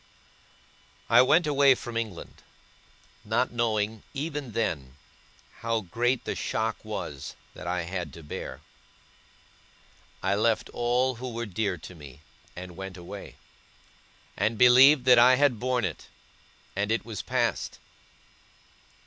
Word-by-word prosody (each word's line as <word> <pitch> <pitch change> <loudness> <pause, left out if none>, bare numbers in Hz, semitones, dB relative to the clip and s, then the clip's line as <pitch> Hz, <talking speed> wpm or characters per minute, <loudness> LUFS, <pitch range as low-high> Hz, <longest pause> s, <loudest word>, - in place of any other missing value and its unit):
I 120 +1 +8
went 160 +7 +4
away 140 -2 +5
from 120 -1 -8
England; 110 -6 -5 0.8
not - - 0
knowing, 110 -2 -1
even 145 -4 -4
then, 75 - -2 0.6
how 115 -1 -1
great 120 +7 -1
the - - -2
shock 110 0 -2
was, 105 -10 -6 0.2
that 80 - -9
I 90 0 -1
had 90 -2 -4
to 85 - -11
bear. 75 - -7 1.6
I 95 +1 +2
left 110 +2 +1
all 125 +2 +1
who 125 +1 -5
were 120 0 -4
dear 100 -2 -2
to 85 +3 -11
me, 75 -6 -13 0.3
and 90 -1 -8
went 95 0 -7
away; 85 -1 -9 1.0
and 110 +3 0
believed 125 +3 +7
that 125 -2 +7
I 125 +2 +7
had 135 -4 +2
borne 125 -2 0
it, - - -5 0.7
and 100 +2 -1
it 115 - 0
was 110 -4 -5
past. - - -1
115 Hz, 130 wpm, -27 LUFS, 95-125 Hz, 1.6 s, I